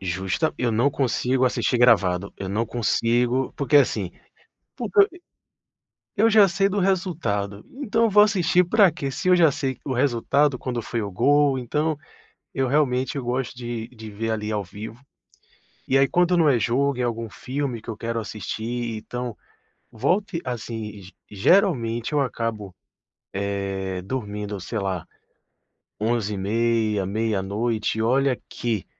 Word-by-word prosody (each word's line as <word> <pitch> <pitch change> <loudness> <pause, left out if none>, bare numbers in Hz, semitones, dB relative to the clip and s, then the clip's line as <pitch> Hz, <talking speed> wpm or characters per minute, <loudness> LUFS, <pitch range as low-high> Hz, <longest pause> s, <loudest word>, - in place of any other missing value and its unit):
Justa 95 - -1
eu 120 -2 0
não 120 +6 +3
consigo 130 -1 +1
assistir 125 0 +1
gravado, 100 -6 +3
eu 95 - -5
não 110 +4 -1
consigo, 120 +2 +1
porque 145 +1 +3
assim, 105 -9 +2 0.7
porque 420 - +2 0.2
eu 355 - -16 1.0
eu 225 +2 +4
já 210 -2 +7
sei 195 +2 +1
do 200 +1 -1
resultado, 160 - -1
então 230 -4 0
eu - - +2
vou 210 0 +7
assistir 180 -4 +3
para 200 +2 +5
quê? 145 -4 -4
Se 135 - -4
eu 180 - +6
já 165 -4 +5
sei 135 -2 -3
o 135 - -2
resultado 135 +2 +2
quando 120 -2 -3
foi 115 - -3
o 100 - -5
gol, 140 +6 +3
então, 150 +5 -1 0.6
eu 135 -1 +1
realmente 135 0 +1
gosto 125 0 -2
de 120 -2 -5
de 110 -3 -10
ver 110 +2 -3
ali 105 -1 -2
ao 105 -2 -1
vivo. 110 +5 -9 0.9
E 135 - +3
aí 135 - +5
quando 180 0 +3
não 160 -3 +5
é 125 -4 +3
jogo, 130 +3 +1
é - - +1
algum 115 -1 -2
filme 130 0 -4
que - - -11
eu 110 - -3
quero 115 0 -3
assistir, 110 +2 -4
então 120 +1 -6 0.5
volte 180 - 0
assim, 110 -4 -5 0.3
geralmente 120 - +2
eu 150 - +2
acabo, 110 -6 -3 0.9
é, 95 -1 -3
dormindo 105 -2 -4
sei 110 +5 -4
lá, 95 -4 -3 0.9
23:30, 110 -1 0
meia-noite, 110 +1 -1
e 110 - 0
olha 130 +2 +2
que 115 -6 -3
120 Hz, 150 wpm, -24 LUFS, 110-140 Hz, 1.0 s, já